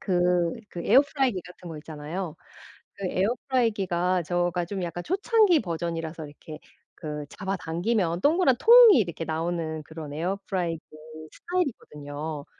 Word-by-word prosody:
그 175 -2 +1 0.2
그 170 - -6
에어프라이어 265 -4 +3
같은 180 0 -12
거 160 - -7
있잖아요. 155 +3 -6 0.6
그 195 - -5
에어프라이어 225 0 0
가 180 +1 +1
저가 175 +1 0
좀 190 0 -4
약간 175 0 -5
초창기 395 -2 +3
버전이라서 165 -3 -4
이렇게 150 +1 -11 0.4
그 150 -2 -6
잡아당기면 185 -1 -2
동그란 310 -3 +4
통이 470 - +9
이렇게 170 -5 -2
나오는 160 0 -3
그런 155 -1 -8
에어프라이어 175 0 -2 0.5
스타일이거든요. 150 - -4
175 Hz, 340 characters per minute, -26 LUFS, 160-215 Hz, 0.6 s, 통이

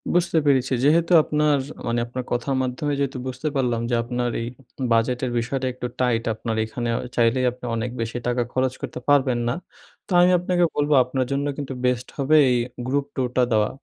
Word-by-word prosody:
বুঝতে 175 -1 +2
পেরেছি। 130 -2 +2
যেহেতু 165 +5 +3
আপনার 150 -1 +2 0.3
মানে 120 0 0
আপনার 125 +1 -5
কথার 120 +3 0
মাধ্যমে 130 +3 -2
যেহেতু 135 -1 -1
বুঝতে 130 +4 -4
পারলাম 120 -3 0
যে, 120 - +2
আপনার 120 0 -2
এই 115 - -3 0.5
বাজেটের 125 +2 +1
বিষয়টা 130 +3 -2
একটু 125 0 -5
টাইট, 120 -2 +1
আপনার 110 +1 -4
এখানে 120 +2 -4
অ - - -2 0.2
চাইলেই 120 +2 +2
আপনি 125 0 -11
অনেক 115 +2 -2
বেশি 115 +1 -3
টাকা 125 0 +1
খরচ 130 0 +1
করতে - - -5
পারবেন 135 -4 +3
না। 120 - 0 0.5
তো - - -14
আমি 180 +1 +5
আপনাকে 180 0 +1
বলবো 145 0 +1
আপনার 130 +1 -2
জন্য 140 +1 0
কিন্তু 140 -2 -4
বেস্ট 125 0 0
হবে 140 +3 +2
এই 125 - +3 0.3
গ্রুপ 140 +1 0
টুরটা 125 -1 +1
দেওয়া। 110 -1 +3
130 Hz, 185 wpm, -23 LUFS, 120-140 Hz, 0.5 s, আমি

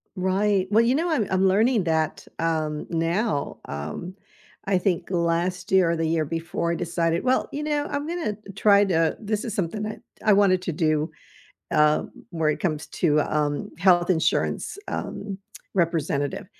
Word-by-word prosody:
Right, 190 +1 +1
well, 220 +2 +5
you 245 +3 +3
know, 335 +4 0
I'm 230 -11 +1
I'm 190 +1 +3
learning 215 +3 +3
that, 160 -2 -1
um, 155 -2 -1
now, 165 0 -1
um, 75 - -6 0.5
I 195 -1 +2
think 180 -2 -1
last 175 +1 0
year 185 -3 +4
or - - +1
the 165 0 -1
year 160 -1 +1
before 165 +2 -2
I - - 0
decided, 170 -1 -1
"Well, 260 0 +2
you 295 - -4
know, 295 -1 0
I'm 285 +1 -3
gonna 330 -11 -2 0.2
try 200 0 +5
to" 165 -4 +1
this 215 0 -2
is 225 - -4
something 200 +3 -2
that 215 0 -5 0.2
I 215 - +6
wanted 195 -2 +4
to 180 - -2
do, 155 -1 0 0.6
uh, 150 0 +3 0.3
where 160 -3 +1
it - - -3
comes 155 -4 -1
to, 150 -3 +2
um, 150 -1 -1
health 175 0 +4
insurance, 170 - 0
um, 200 -2 -5 0.4
representative, 160 -5 0
175 Hz, 165 wpm, -24 LUFS, 160-205 Hz, 0.6 s, I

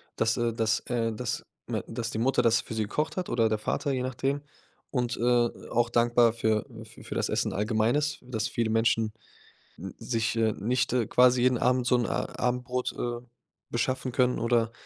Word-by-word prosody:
das, 110 0 +1
äh 120 0 +1
das, 110 -1 +1
äh 115 -2 0
das 125 +8 -3 0.2
me 110 -3 -2
das 115 0 -4
die 110 - -4
Mutter 125 +3 +2
das 115 -1 +3
für - - -8
sie 110 - -1
gekocht 150 +9 -2
hat 180 - -2
oder 115 -1 +2
der 110 -1 0
Vater, 140 +6 -1
je 130 -2 -1
nachdem. 135 +3 -1 0.5
Und, 125 -2 -1
äh, 120 0 +3 0.2
auch 120 0 +1
dankbar 120 -1 +4
für 110 -2 0 0.2
fü 110 - -14
für - - -6
das - - 0
Essen - - 0
allgemein 110 +3 +1
ist, 150 0 0
dass 115 -4 -2
viele 115 -2 -1
Menschen 115 -1 +2 0.6
n - - -7
sich 115 -1 -1
äh, 110 -1 +2
nicht 125 +6 0 0.2
quasi 125 0 +5
jeden 125 -2 +3
Abend 125 0 +2
so 125 - +4
'n, 120 - 0
äh, - - -2
Abendbrot, 125 0 -2
äh, 120 -1 -3 0.5
beschaffen 130 +1 -1
können 125 0 +2
oder, 115 -1 +1
120 Hz, 195 wpm, -28 LUFS, 115-125 Hz, 0.6 s, quasi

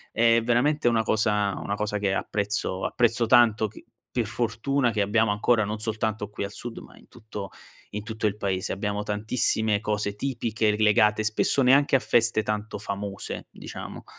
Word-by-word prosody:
è 115 0 +4
veramente 120 +4 +2
una 115 -1 +3
cosa 105 -2 +1
una 100 - -2
cosa 105 0 -2
che 100 -1 0
apprezzo 100 -2 -2
apprezzo 115 -1 +2
tanto 110 -2 +4
che 105 - -14 0.3
per 120 - +1
fortuna, 120 +3 0
che 105 -2 0
abbiamo 105 +1 +2
ancora 110 +1 +2
non 105 +1 -4
soltanto 110 -1 -2
qui 105 -1 -4
al 100 - -7
sud 120 +3 -7
ma - - -15
in - - -20
tutto 105 -4 -8 0.4
in 105 0 -5
tutto 110 -1 -4
il 105 0 0
paese 95 -2 -2
abbiamo 105 +1 -2
tantissime 110 0 0
cose 105 -1 -2
tipiche 115 -4 -1
legate 105 0 +3
spesso 110 +5 +1
neanche 135 +2 +5
a - - -3
feste 115 -2 +2
tanto 105 0 -3
famose, 100 -1 -5
diciamo. - - -9
110 Hz, 170 wpm, -26 LUFS, 105-115 Hz, 0.4 s, neanche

